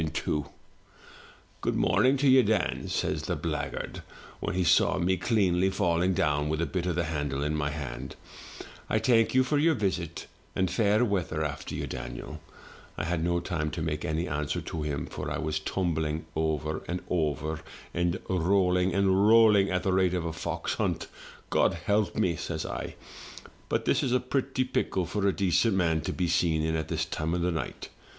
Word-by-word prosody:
78 80 0 -3
THROUGH - - 0
FAIRY 75 - +1
HALLS 70 - -18 1.1
'Good - - 0
morning 130 +2 +3
to 140 +1 +2
you, 130 0 +7
Dan/ 105 -5 0
says - - -1
the - - -2
blackguard, - - -4 0.4
when - - -3
he 95 - +2
saw 85 - +4
me 90 +1 +2
cleanly 95 -2 +2
falling 90 -2 +1
down 75 -1 +1
with 80 0 -1
a 85 - +1
bit 85 +4 -2
of 90 - 0
the 90 - +1
handle 75 -3 -2
in 75 +1 -1
my 75 -1 0
hand, 75 -4 -6 0.4
' - - -13 0.3
I - - +2
thank 115 -1 +3
you 130 - +6
for 145 +3 +1
your 160 +1 +4
visit, 90 -6 -2 0.3
and 95 -1 +1
fair 110 +1 +3
weather 90 -7 -1
after 75 -3 -4
you, - - -3
Daniel/ - - -7 0.6
I - - -2
had 80 0 -1
no 85 0 +1
time 80 -3 -2
to 80 - -4
make 75 -1 -2
any 80 +3 -1
answer 75 -1 -2
to 80 - -5
him, 70 -2 -2
for - - -5
I - - -2
was 80 -1 -1
tumbling 80 -2 -1
over 80 -1 -1
and 90 +1 -3
over, 80 -1 -1 0.3
and 85 +1 0
rolling 90 0 +2
and 100 +1 +3
rolling, 110 -3 +6
at 90 0 0
the 95 - +1
rate 95 -1 +3
of 85 -2 -2
a 80 - -3
fox - - -3
hunt. - - -2 0.4
'God - - +3
help 105 -3 0
me!' 85 -2 +1
says - - -4
I. - - -5 0.7
*But - - 0
this - - +2
is 125 - 0
a 125 - +4
pretty 130 +1 -1
pickle 95 -7 -1
for 100 +3 -1
a - - +4
decent 95 +3 +2
man 80 -4 +2
to - - -3
be 90 - -1
seen 85 -2 +2
in 80 0 0
at 80 0 -2
this 80 0 -1
time 80 +1 -2
o* - - 0
night. 85 -2 -3
85 Hz, 200 wpm, -28 LUFS, 80-95 Hz, 1.1 s, you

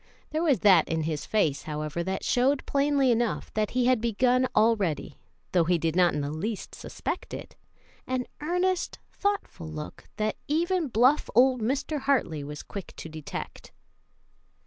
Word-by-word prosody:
There 310 +1 0
was 285 - +2
that 185 -6 +6
in 160 -1 0
his 155 -2 -3
face, 160 -10 +1
however, 155 +2 -3
that 190 +2 -3
showed 265 +3 +2
plainly 280 -2 +2
enough 235 -1 -1
that 215 -1 0
he 250 -1 +1
had 250 -3 +3
begun 250 +3 +2
already, 210 -10 +1 0.3
though 175 -3 +3
he 175 +1 +3
did 165 0 -1
not 175 -2 +4
in 150 - -1
the 145 0 -3
least 195 +7 -4
suspect - - -5
it; - - -9 0.5
an 255 -1 -1 0.2
earnest, 360 +3 0
thoughtful 400 - -2
look 155 -1 -8
that 215 0 -1
even 340 +2 +1
bluff 255 +5 +3
old 255 0 +5
Mr. 280 +6 -1
Hartley 250 - 0
was 150 +1 -7
quick 200 -3 -8
to 160 - -8
detect. 155 -2 -7
225 Hz, 160 wpm, -27 LUFS, 165-270 Hz, 0.5 s, that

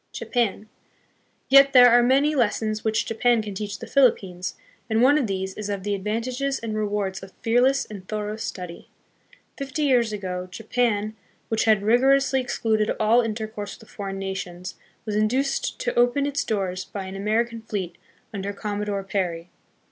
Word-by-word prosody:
Japan. 220 -3 -1 0.8
Yet 275 +1 +7
there 245 -2 +9
are 240 +1 +6
many 275 +5 +3
lessons 215 -4 0
which 220 0 +1
Japan 230 0 +2
can 205 -1 -6
teach 205 +1 -4
the - - -8
Philippines, 190 -9 +1 0.3
and 220 0 +2
one 280 +3 +6
of 260 - 0
these 190 -1 -3
is 210 0 -6
of 200 -2 -3
the 205 0 -1
advantages 245 +7 -2
and 225 -2 -4
rewards 205 -2 -2
of 190 0 -11
fearless 250 +4 +3
and 195 -3 -10
thorough 210 0 -3
study. 180 -6 -7 0.7
Fifty 275 +2 -3
years 245 -5 +3
ago, 185 -3 -4
Japan, 220 +1 -1 0.3
which 225 -1 +1
had 215 -3 +4
rigorously 265 +4 +3
excluded 220 -3 0
all 220 +3 +4
intercourse 220 -2 -5
with 220 - -17
foreign 195 -2 -5
nations, 185 -1 -5 0.3
was 210 -2 -3
induced 255 +6 0
to - - -1
open 245 +4 +3
its 285 0 -1
doors 190 -4 -2
by 195 -2 -7
an 190 +1 -7
American 225 +3 -1
fleet 195 -6 -4 0.4
under 200 0 -4
Commodore 205 -1 -3
Perry. 180 -3 -3
215 Hz, 160 wpm, -24 LUFS, 195-245 Hz, 0.8 s, there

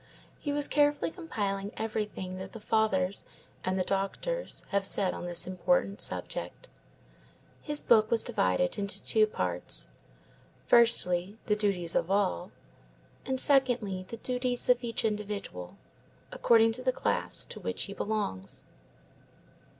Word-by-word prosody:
He 290 - -3
was 290 0 +2
carefully 290 +1 +2
compiling 205 - -3
everything 210 -4 -3
that 190 - -8
the 225 - -8
Fathers 205 -3 +1 0.4
and 185 0 -1
the 185 - +1
doctors 200 - -2
have 200 0 +1
said 195 -1 +1
on 175 - -6
this 175 -1 +2
important 185 +2 0
subject. - - -4 0.9
His 295 -1 +1
book 220 -2 +5
was 230 - +3
divided 90 - 0
into 200 0 -1
two 215 -1 +4
parts: 90 - -1 0.7
firstly, 205 -5 +4
the 210 - +2
duties 195 -5 0
of 165 - 0
all; 195 - +1 0.9
secondly, 245 -9 +2
the 230 - -6
duties 250 +1 -1
of 245 0 +4
each 230 -1 -1
individual, 205 - -4 0.5
according 225 -1 +4
to 240 +3 0
the 255 0 +2
class - - 0
to - - -8
which - - -2
he 200 - -6
belongs. 200 - -3
210 Hz, 130 wpm, -30 LUFS, 185-235 Hz, 0.9 s, book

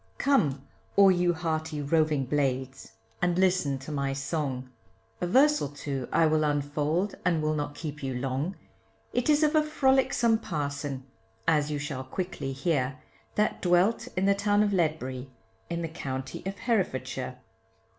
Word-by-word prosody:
Come 150 - +2 0.3
all 195 -1 +7
you 175 -1 +3
hearty 160 -2 -2
roving 150 -1 +2
blades, 135 -1 -2 0.3
and 175 0 +2
listen 185 -7 +2
to 135 +3 -8
my 140 -2 -1
song, 140 -2 -2 0.5
A 175 - 0
verse 295 +9 +5
or 140 - -2
two 140 -3 -5
I 165 - +4
will 155 0 +3
unfold, 150 +5 0
and 175 -3 +2
will 155 0 +1
not 145 -1 -3
keep 150 -2 -6
you 135 -2 -3
long, 135 +8 -2 0.6
It 245 +3 0
is 300 +1 +5
of 300 0 +3
a 310 - +5
frolicsome 265 -6 +3
parson, 145 - -3 0.4
as 150 -2 +3
you 150 - -1
shall 140 -3 -4
quickly 140 -1 -4
hear, 135 -1 0 0.4
That 210 - +1
dwelt 180 +5 +3
in 190 - +2
the 200 - +5
town 205 +1 +2
of 205 -1 +1
Ledbury, 140 -7 -1 0.4
in 170 0 -2
the - - -1
county 130 -5 -5
of 195 - -4
Herefordshire. 130 - -1
155 Hz, 155 wpm, -28 LUFS, 140-185 Hz, 0.6 s, all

